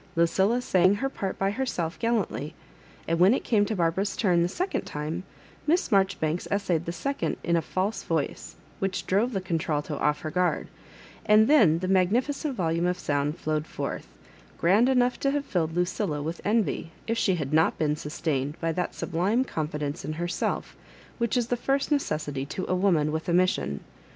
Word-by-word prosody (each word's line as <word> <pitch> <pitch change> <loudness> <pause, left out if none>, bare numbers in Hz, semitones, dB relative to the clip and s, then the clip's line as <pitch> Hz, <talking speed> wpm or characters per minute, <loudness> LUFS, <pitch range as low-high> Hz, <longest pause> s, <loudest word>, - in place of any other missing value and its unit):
Lucilla 190 +7 +3
sang 185 -1 +4
her 270 +6 -1
part 195 -7 -4
by 195 0 +1
herself 195 -8 -2
gal 230 0 +2
lantly; 155 - -3 0.5
and 165 0 0
when 190 +7 +6
it - - -3
came 210 -3 +3
to 220 - -2
Barbara's 180 +3 0
turn 180 -6 +3
the 170 - +2
second 365 - -2
time, 150 +4 -4 0.5
Mi8s 340 -4 +2
Marjoribanks 190 -5 +1
essayed 180 -5 0
the 170 - -2
second 275 +10 -2
in 170 - +1
a 165 - +2
false 190 +6 -2
voice, 160 -4 -3 0.2
which 195 -1 -2
drove 210 +7 +2
the 195 - -1
contralto 160 -5 -2
off 150 0 +1
her 155 - -4
guard; 180 +1 0 0.5
and 215 0 +5
then 215 - +5
the 185 +2 -3
magnifloent 235 - +1
volume 170 -2 0
of 180 0 0
sound 145 0 -1
flowed 155 -1 -2
forth, - - -5 0.5
grand 205 +9 +4
enough 250 -1 +2
to 275 - +1
have 285 0 -1
filled 165 - -1
Lucilla 175 -3 -1
with 160 +4 -4
envy 210 -5 0 0.2
if 230 - 0
she 195 -5 +2
had 150 -3 -3
not 160 +1 +3
been 150 -1 +1
sustained 150 -1 -3
by 165 -1 0
that 180 +2 -2
sub - - -6
lime 200 +10 +2
confidence 150 - -3
in 155 - -3
herself 175 +3 -2 0.4
which 235 +1 +1
is 240 -1 0
the 245 - +2
first 275 +4 0
neces 160 - 0
sity 140 -1 -4
to 185 - -3
a - - 0
woman 180 -5 +2
with 160 +3 -3
a - - +2
mission. 180 - +1
180 Hz, 190 wpm, -27 LUFS, 160-215 Hz, 0.5 s, when